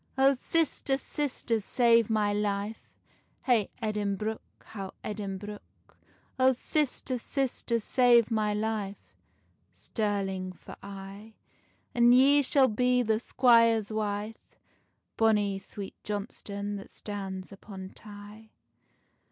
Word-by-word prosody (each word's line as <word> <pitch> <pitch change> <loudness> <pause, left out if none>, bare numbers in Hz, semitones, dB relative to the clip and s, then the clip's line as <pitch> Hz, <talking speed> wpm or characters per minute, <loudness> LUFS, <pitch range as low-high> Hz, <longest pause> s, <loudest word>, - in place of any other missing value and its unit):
"Oh, 270 +1 +5
sister, 275 0 0
sister, 265 -5 -2
save 230 +1 +3
my 210 -2 +2
life, 205 +1 -2 0.5
Hey 235 -6 +2
Edinbruch, 210 0 -1 0.2
how 195 -3 -8
Edinbruch. 205 0 -5 0.8
Oh 260 0 +5
sister, 260 -1 -1
sister, 250 -2 -1
save 240 0 +4
my 215 -1 +1
life, 210 -1 -2 0.8
Stirling 195 -4 -2
for - - -12
aye: 200 +2 -10 0.6
And 240 0 +6
ye 280 +3 +6
shall 270 0 +4
be 250 +2 +2
the 220 -1 +1
squire's 230 -3 +4
wife, 210 0 -4 0.6
Bonny 210 -3 +2
Sweet 195 0 -8
Johnstonne 205 -1 -4
that 195 - -10
stands 195 -2 -6
upon 195 -1 -9
Tay." 210 +1 -12
215 Hz, 100 wpm, -29 LUFS, 205-240 Hz, 0.8 s, And